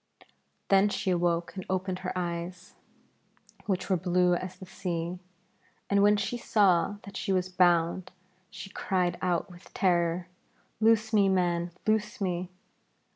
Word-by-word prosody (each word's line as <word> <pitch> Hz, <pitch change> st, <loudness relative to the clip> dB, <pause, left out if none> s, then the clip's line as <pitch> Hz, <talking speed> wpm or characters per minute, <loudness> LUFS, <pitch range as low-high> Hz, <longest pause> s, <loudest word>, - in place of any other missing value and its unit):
Then 195 Hz, +1 st, +5 dB
she 200 Hz, -1 st, -1 dB
awoke 175 Hz, 0 st, 0 dB
and 190 Hz, -, -5 dB
opened 185 Hz, 0 st, -1 dB
her 185 Hz, 0 st, -4 dB
eyes, 175 Hz, +1 st, -4 dB, 0.9 s
which 190 Hz, -2 st, -1 dB
were 190 Hz, -, +2 dB
blue 180 Hz, 0 st, +2 dB
as 185 Hz, +1 st, -4 dB
the 190 Hz, -, -10 dB
sea, 175 Hz, -2 st, -4 dB, 0.7 s
and 200 Hz, 0 st, +4 dB
when 205 Hz, +1 st, +5 dB
she 205 Hz, +4 st, -2 dB
saw 200 Hz, -4 st, +3 dB
that 200 Hz, -1 st, -11 dB
she 195 Hz, -, -2 dB
was 185 Hz, -1 st, +1 dB
bound, 175 Hz, -1 st, +2 dB, 0.4 s
she 195 Hz, -, -9 dB
cried 180 Hz, -4 st, -1 dB
out 180 Hz, +1 st, -1 dB
with 175 Hz, +1 st, -15 dB
terror, 175 Hz, -1 st, +1 dB, 0.5 s
'Loose 220 Hz, 0 st, +3 dB
me, 200 Hz, -2 st, +5 dB
man, 175 Hz, -2 st, +1 dB, 0.2 s
loose 215 Hz, +2 st, 0 dB
me!' 180 Hz, -2 st, -2 dB
185 Hz, 140 wpm, -28 LUFS, 175-200 Hz, 0.9 s, Then